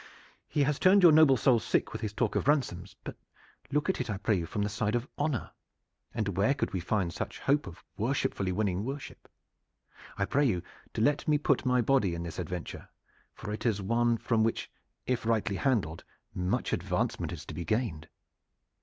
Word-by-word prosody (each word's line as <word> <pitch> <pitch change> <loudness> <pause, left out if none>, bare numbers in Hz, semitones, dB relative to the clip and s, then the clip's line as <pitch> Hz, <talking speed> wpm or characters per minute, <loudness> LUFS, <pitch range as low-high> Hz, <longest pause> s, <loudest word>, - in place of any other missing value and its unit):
He 145 - +1
has 145 0 0
turned 190 +1 +5
your 170 - +9
noble 150 -4 +6
soul 120 -1 +4
sick - - 0
with - - -5
his 105 - -2
talk 110 +1 -1
of - - 0
ransoms; 110 - 0
but - - -6 0.6
look 150 +1 +1
at 190 - 0
it, - - -4
I 105 - -1
pray 105 +2 +1
you, 85 -3 -2
from 105 - -2
the - - 0
side 105 +1 -1
of 120 +2 -1
honor, 145 -4 -2 0.6
and 105 -5 -2
where 105 +8 +3
could 130 - -2
we 95 - 0
find 90 -1 -1
such - - -5
hope 145 +2 +1
of 85 - -11
worshipfully 105 -4 0
winning 95 -1 0
worship? 135 +3 -7 0.9
I 100 - +1
pray 145 +8 +2
you 90 -9 +1 0.3
to - - -1
let 145 +5 +2
me 150 -1 +4
put 140 -3 +1
my 125 -1 +3
body 115 -8 +2
in 85 - -4
this 85 0 -6
adventure, 90 0 -6 0.5
for 105 - -6
it 105 - -5
is 110 -4 +1
one 115 +4 +2
from 110 0 +1
which, 115 - -1 0.3
if 125 -1 -1
rightly 110 -3 0
handled, 95 - 0 0.3
much 90 0 -1
advancement - - -1
is - - -7
to - - -8
be 85 - -4
gained." 110 -8 -1
110 Hz, 200 wpm, -30 LUFS, 95-135 Hz, 0.9 s, your